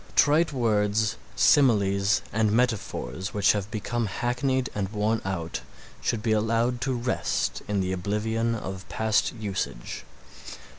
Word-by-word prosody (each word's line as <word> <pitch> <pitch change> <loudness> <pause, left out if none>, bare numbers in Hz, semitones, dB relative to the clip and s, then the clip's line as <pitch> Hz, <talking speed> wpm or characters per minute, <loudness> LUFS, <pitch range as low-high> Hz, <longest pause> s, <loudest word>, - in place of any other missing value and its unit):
Trite 155 +3 +4
words, 105 -4 +1 0.2
similes 100 -7 +4
and 110 0 +2
metaphors 105 - -1
which 100 -1 +5
have 100 -1 -2
become 115 +1 -2
hackneyed 125 +5 0
and 100 -2 -2
worn 110 +1 0
out 85 -8 -3 0.4
should 110 -2 -1
be 115 - +1
allowed 115 +3 +1
to 130 - 0
rest 120 +1 -1
in 100 -2 0
the 95 0 -1
oblivion 110 +5 -1
of 95 -3 -6
past 110 -1 +1
usage. 100 - -4
110 Hz, 130 wpm, -26 LUFS, 100-120 Hz, 0.4 s, which